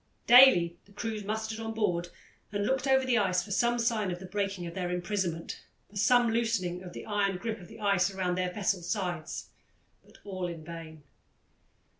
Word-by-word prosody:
Daily 240 -9 +7
the 200 - -22
crews 220 0 -4
mustered 220 +2 -3
on 225 0 -4
board 175 -5 0 0.4
and 205 -1 -1
looked 265 +3 0
over 265 0 +4
the 245 -2 +3
ice 185 -3 +1
for 210 - -10
some 240 +4 +2
sign 230 -4 0
of 175 - -3
the 190 - -9
breaking 195 -1 -2
of 170 - -6
their 180 0 -3
imprisonment, 180 -2 -3 0.3
for - - -18
some 240 +3 +4
loosening 225 -6 0
of 180 -2 -9
the - - -8
iron 200 -3 0
grip 220 +2 -4
of 175 - -12
the 225 0 -13
ice 200 -3 +2
round 185 -2 -1
their 180 0 -1
vessel's 185 -3 -1
sides, 180 -7 -3 0.5
but - - -20
all 185 -3 -4
in 165 -2 -7
vain. 160 -2 -9
200 Hz, 190 wpm, -29 LUFS, 180-225 Hz, 0.5 s, Daily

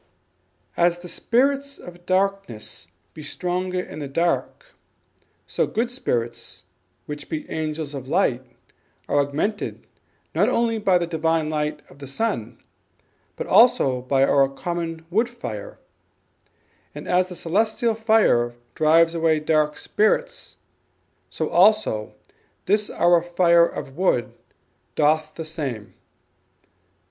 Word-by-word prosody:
"As 175 0 +2
the 175 0 -10
Spirits 275 +9 0
of 175 0 -13
Darkness 190 - -2 0.3
be 155 - -10
stronger 180 +4 -2
in 180 - -7
the 145 - -4
dark, 170 - -2 0.7
so - - -1
Good 235 +2 -1
Spirits, 115 - -3 0.4
which 145 -1 -8
be 155 -1 -4
Angels 155 -1 -3
of 135 -2 -7
Light, 135 -6 +1 0.6
are 145 - +2
augmented 150 +10 -2 0.5
not - - +3
only 230 -1 +1
by 190 -3 +3
the 175 - -1
Divine 160 -1 0
light 150 -1 -2
of 140 - -18
the 140 - -8
Sun, 130 - -2 0.8
but - - -4
also 130 -2 +4
by 135 +1 +2
our 135 0 +4
common 165 +2 -5
Wood 225 +6 +2
Fire: 115 - -7 1.2
and - - -8
as 180 +1 +2
the 180 - -7
Celestial 220 +7 0
Fire 220 - +2 0.2
drives 165 +2 +4
away 165 -2 +2
dark 150 -1 +1
spirits, - - -1 0.7
so 160 - -3
also 180 - +3 0.5
this 210 +2 +1
our 175 0 +3
Fire 170 -1 +4
of 135 - -7
Wood 145 - +1 0.6
doth 155 +1 +2
the 160 - -6
same." 130 - -5
165 Hz, 120 wpm, -23 LUFS, 145-195 Hz, 1.2 s, also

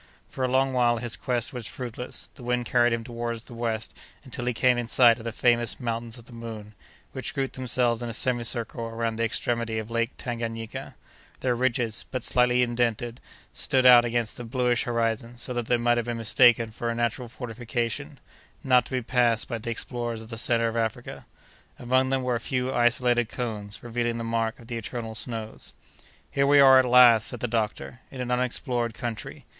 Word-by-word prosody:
For 130 - -5
a - - +3
long 130 +1 +2
while 120 -2 +3
his 120 0 -1
quest 120 -1 -1
was 125 -3 -5
fruitless; 125 -1 -5
the 140 - -14
wind 125 0 -1
carried 120 0 +3
him 115 0 -1
toward 115 0 -4
the 120 - -11
west 115 -1 -3 0.3
until 125 -3 -6
he 125 - +1
came 125 +1 +3
in 120 - -3
sight 120 -1 +6
of 115 - -10
the 115 - -2
famous 120 0 +1
Mountains 115 -1 -3
of 115 - -14
the 120 - -15
Moon, 110 -2 -8 0.4
which - - -5
grouped 135 -1 -2
themselves 125 -2 +1
in 120 - -4
a - - -4
semicircle 120 -1 -1
around 115 0 -3
the 115 - 0
extremity 115 0 -1
of 110 +1 -5
Lake 115 0 0
Tanganayika; 115 -2 -5 0.5
their 125 -1 +1
ridges, 120 -2 0
but 130 -3 -4
slightly 125 0 +3
indented, 120 0 -1 0.3
stood 130 -1 +1
out 125 -1 +9
against 120 -2 -2
the 120 - -6
bluish 125 0 0
horizon, 115 0 -1
so 125 - -1
that 120 -2 -3
they 120 - +3
might 120 0 +2
have 120 - -4
been 120 -1 -2
mistaken 115 0 +4
for 115 +2 -4
a 115 - -2
natural 120 +1 -1
fortification, 115 - -4 0.4
not 125 -2 +4
to - - -13
be 130 -1 -1
passed 120 -2 +2
by 115 -2 -4
the 115 - -6
explorers 120 -1 -3
of 110 - -14
the 115 - -6
centre 115 0 +2
of 115 - -3
Africa. 115 -2 -3 0.5
Among 130 +2 +1
them 135 -1 0
were 125 -1 0
a 120 - 0
few 125 +1 -2
isolated 120 -1 +2
cones, 110 -3 -5
revealing 120 0 -2
the 115 - -4
mark 115 0 -1
of 115 - -13
the 120 0 -5
eternal 115 0 -5
snows. 110 -1 -5 0.6
"Here 140 0 +2
we 145 0 +6
are 135 -1 +8
at 130 - +3
last," 120 -3 +7
said 125 - -2
the 125 - 0
doctor, 110 +1 -3
"in 130 - -10
an 125 -1 -3
unexplored 125 -1 -1
country! 115 -3 -6
120 Hz, 200 wpm, -26 LUFS, 115-125 Hz, 0.6 s, out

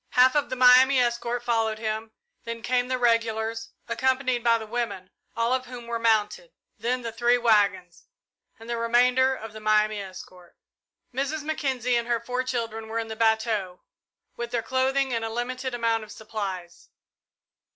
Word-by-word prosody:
Half 255 +1 +6
of 290 -1 +1
the 255 - -3
Miami 255 +1 +6
escort 240 0 -1
followed 225 -2 0
him, 220 0 -4 0.3
then 230 0 -6
came 245 0 +1
the 255 0 -1
regulars, 230 -1 0 0.2
accompanied 255 +1 0
by 230 -1 +4
the 220 - -7
women, 220 -5 -4 0.3
all 230 +2 +1
of 255 0 -1
whom 245 -1 -9
were 235 0 -3
mounted; 230 - +1 0.3
then 250 +1 -1
the 230 - -4
three 240 +2 +2
waggons, 205 -7 +1 0.5
and 225 - -13
the 235 0 -2
remainder 250 +3 +3
of 225 -3 -9
the 215 - -8
Miami 215 0 +2
escort. 185 -2 -12 0.6
Mrs. 280 +4 -2
Mackenzie 265 -5 -1
and 235 0 -2
her 240 -1 +1
four 250 +2 -2
children 230 -3 -4
were 225 +1 -4
in 225 -1 -3
the 220 - -5
bateau, 220 -4 0 0.5
with 240 0 -5
their 235 -1 -2
clothing 265 +1 0
and 230 -1 -1
a 225 - -2
limited 250 +2 -3
amount 230 -2 0
of 215 - -12
supplies. 195 -5 -6
235 Hz, 170 wpm, -26 LUFS, 220-250 Hz, 0.6 s, Half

